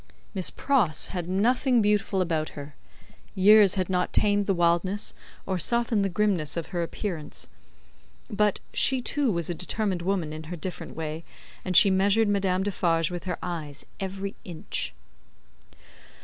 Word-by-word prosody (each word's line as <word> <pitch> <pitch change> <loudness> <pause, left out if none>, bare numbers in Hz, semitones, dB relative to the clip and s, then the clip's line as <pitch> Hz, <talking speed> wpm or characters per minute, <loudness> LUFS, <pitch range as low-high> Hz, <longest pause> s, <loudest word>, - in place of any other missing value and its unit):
Miss 190 -3 +2
Pross 220 - +1
had 175 -2 -4
nothing 245 +6 +2
beautiful 205 -2 +1
about 160 -3 -2
her; 145 0 -8 0.6
years 205 +1 +6
had 185 -2 -1
not 180 -1 0
tamed 205 -1 +2
the 195 - +3
wildness, 175 +4 0 0.3
or 190 -1 -2
softened 235 +1 +2
the 195 - 0
grimness, 180 -5 0
of 165 - -2
her 175 - 0
appearance; 170 -3 -4 0.8
but, 210 -2 +1
she 265 -1 +3
too 270 0 0
was 170 -4 -1
a 175 - -1
determined 185 +1 -2
woman 175 -4 -1
in 155 0 -7
her 175 +3 -6
different 170 -1 -7
way, 160 0 -5 0.4
and 185 -2 +2
she 200 - +7
measured 200 +4 +3
Madame 190 -2 +1
Defarge 170 -4 0
with 175 0 -6
her 180 -2 -3
eyes, 155 -5 -5
every 195 0 -4
inch. 165 - -4
185 Hz, 150 wpm, -26 LUFS, 170-205 Hz, 0.8 s, she